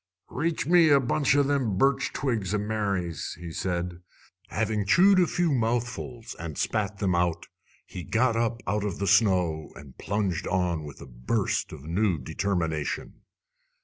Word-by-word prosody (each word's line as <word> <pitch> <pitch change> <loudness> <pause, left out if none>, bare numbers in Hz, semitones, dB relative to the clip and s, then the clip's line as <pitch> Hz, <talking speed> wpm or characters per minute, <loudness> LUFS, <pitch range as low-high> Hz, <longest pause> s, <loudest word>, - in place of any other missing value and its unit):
"Reach 160 +4 -1
me 170 0 +5
a 140 -1 +6
bunch 135 +2 +1
o' 145 - +4
them 135 -8 0
birch 135 +6 +2
twigs 110 -8 -1
o' - - +2
Mary's," 100 -5 -2
he 85 -1 -7
said. 90 0 -3 0.5
Having 105 -2 -1
chewed 190 - +6
a 180 - +4
few 175 -1 0
mouthfuls 120 0 -2
and 80 -3 -6
spat 105 -2 -1
them 95 -3 0
out, 85 -1 0 0.4
he 90 - -8
got 115 +4 +1
up 115 0 -1
out 105 +2 -1
of 100 -4 -3
the 100 - -2
snow 90 -6 +2
and 70 -3 -13
plunged 100 -4 -1
on 85 -4 0
with 75 - -10
a - - -8
burst 65 - -2
of 75 -3 -10
new 90 +3 0
determination. 80 +1 -3
100 Hz, 160 wpm, -27 LUFS, 85-120 Hz, 0.5 s, a